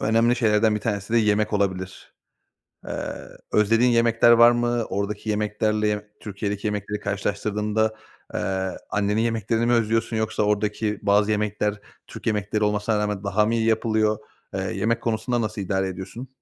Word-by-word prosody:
önemli 115 +3 +3
şeylerden 110 -2 +3
bir 105 - -2
tanesi 100 -1 -3
de 120 - +5
yemek 105 0 +2
olabilir. 95 -2 -2 0.7
Eee, - - -4 0.4
özlediğin 115 +4 +4
yemekler 115 0 +4
var 120 0 +8
mı? 120 -1 0
Oradaki 100 +2 -3
yemeklerle, 105 0 0
ye 105 0 -3
Türkiye'deki 100 0 -4
yemekleri 105 0 -3
karşılaştırdığında, 105 +2 -1 0.4
eee, 95 0 -2
annenin 105 +1 +1
yemeklerini 115 0 0
mi 120 - +2
özlüyorsun 115 0 +1
yoksa 110 -1 -1
oradaki 105 0 0
bazı 100 +1 +3
yemekler 105 0 -1 0.3
Türk - - -11
yemekleri 105 -1 0
olmasına 105 +1 0
rağmen 105 -1 -2
daha 105 +2 +2
mı 115 - 0
iyi 115 - +1
yapılıyor? 110 -1 +1 0.4
Eee, 95 - -1
yemek 100 +5 -1
konusunda 120 +2 -1
nasıl 110 -1 -3
idare 95 0 -1
ediyorsun? 95 +7 -7
105 Hz, 150 wpm, -24 LUFS, 105-115 Hz, 0.7 s, var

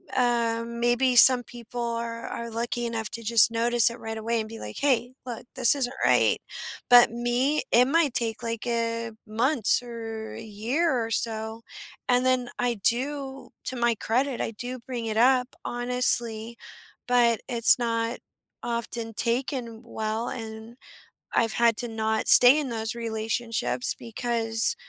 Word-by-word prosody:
Uh, 235 -2 +1
maybe 240 +2 +1
some 250 0 +8
people 240 0 -10
are 230 0 -4
are 235 0 -6
lucky 235 +1 -3
enough 225 -2 -4
to 230 - -7
just 230 0 +5
notice 235 0 +3
it 235 - -10
right 225 0 -6
away 230 +1 -1
and 215 0 -5
be 225 - -9
like, 105 - -8
"Hey, 250 -3 +1
look, 240 -1 -7
this 255 +1 +5
isn't 260 -2 -2
right." - - +3 0.5
But 245 -2 +7
me, 240 +5 0
it 245 +2 +5
might 300 -2 +2
take, 225 -1 -1
like, 230 -1 -4
a 230 -1 -2 0.2
months 235 +2 +1
or 225 -2 -7
a - - -8
year 230 +10 -1
or 225 - -7
so, 220 0 -2 0.5
and 250 0 +3
then 255 -1 +1
I 245 -1 0
do 270 +2 -2 0.2
to 260 - -3
my 240 0 +2
credit, 250 +4 -1
I - - -2
do 245 +3 -7
bring 240 -1 -6
it 220 -1 -3
up 250 +1 +3 0.2
honestly, 240 -2 0 0.5
but 240 -2 +3
it's 235 -2 +5
not 230 0 -1 0.5
often 235 -1 -4
taken 235 0 -3
well, 220 0 -3
and 225 -1 -8 0.6
I've 225 -1 +1
had 235 -2 +2
to 245 - -3
not 220 -1 -2
stay 250 +4 +7
in 285 -3 -3
those 225 0 -3
relationships, 230 +1 -1
because 225 -1 +1
235 Hz, 155 wpm, -26 LUFS, 225-245 Hz, 0.6 s, some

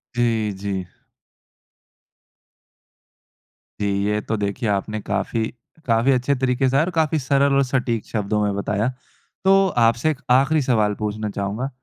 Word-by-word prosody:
जी, 115 -3 +1
जी। 95 -2 -3 3.0
जी, 100 - +1 0.2
ये 105 0 +1
तो 110 - -2
देखिए 105 +3 -2
आपने 105 +2 -1
काफ़ी 105 +3 -1 0.4
काफ़ी 115 +3 +3
अच्छे 130 +2 +1
तरीके 130 0 +1
से 135 - +1
और 160 +5 +2
काफ़ी 160 -1 +2
सरल 140 +1 +2
और 140 - +4
सटीक 125 -4 -1
शब्दों 105 -1 -1
में 105 - 0
बताया। 105 +3 -1 0.5
तो 195 0 +5
आपसे 115 +5 +3
एक 140 - -6
आख़िरी 140 +4 +4
सवाल 110 -5 +2
पूछना 105 0 -3
चाहूँगा। 100 +7 -3
115 Hz, 135 wpm, -22 LUFS, 105-135 Hz, 3.0 s, तो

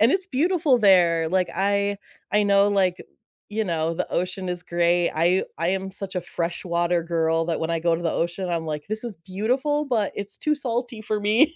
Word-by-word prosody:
And 225 +4 +5
it's 380 +2 +1
beautiful 320 -4 +2
there. 170 -5 +4
Like, 185 0 +1
I 200 +1 +1 0.4
I 210 0 +4
know, 200 0 +4
like, 190 -3 +2 0.5
you 215 +1 -1
know, 165 -4 -1
the 175 - -3
ocean 185 +1 -2
is 180 0 -4
great, 175 0 +1
I 175 +4 +2
I 165 +1 0
am 190 +1 -1
such 195 -1 -6
a - - +1
freshwater 170 0 -1
girl 165 -1 +1
that 165 -2 -1
when 160 +1 -1
I 165 - 0
go 170 0 +2
to 165 - -3
the 165 - 0
ocean, 175 +2 -2
I'm 165 -2 -2
like, 150 -1 -4
"This 215 +2 -3
is 230 -5 -4
beautiful, 255 +10 0
but 225 -7 0
it's 200 0 -4
too 305 - +1
salty 245 -3 -2
for 215 -1 -2
me." 230 +11 +3
190 Hz, 210 wpm, -24 LUFS, 170-215 Hz, 0.5 s, And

